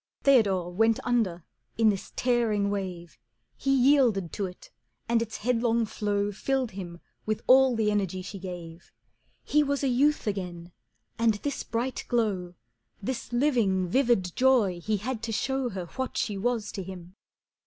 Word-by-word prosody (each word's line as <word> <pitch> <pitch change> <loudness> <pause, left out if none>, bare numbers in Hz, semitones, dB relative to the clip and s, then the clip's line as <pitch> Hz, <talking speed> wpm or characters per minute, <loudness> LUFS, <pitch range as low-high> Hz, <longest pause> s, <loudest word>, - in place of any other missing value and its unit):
Theodore 195 -10 +3
went 225 +4 +3
under 205 -9 0 0.3
in 225 -1 +5
this 195 -3 -3
tearing 225 -5 +1
wave, 180 -4 -5 0.4
He 275 - -1
yielded 250 - +3
to 200 - -2
it, 180 - -13 0.4
and 230 0 +2
its 225 -1 -4
headlong 235 0 +1
flow 205 -1 -1
Filled 260 +4 -1
him 175 -3 -8 0.3
with 215 -1 -1
all 260 -1 +6
the 215 -2 +1
energy 190 -3 -1
she 195 +1 -7
gave. 175 -3 -9 0.5
He 300 - +3
was 280 -1 -1
a - - +2
youth 280 +4 +2
again, 180 -4 -4 0.5
and 230 -2 +3
this 280 +7 -3
bright 240 +3 -3
glow, 195 -7 -1 0.4
This 240 +4 -4
living, 235 -8 +2
vivid 235 -7 +2
joy 240 -9 +3
he 215 +4 -1
had 220 +3 -4
to 230 -1 -3
show 265 +3 -1
Her 190 -4 -5
what 260 +9 -5
she 210 - -1
was 225 +1 -1
to 195 - -5
him. 180 -1 -9
215 Hz, 155 wpm, -27 LUFS, 190-245 Hz, 0.5 s, all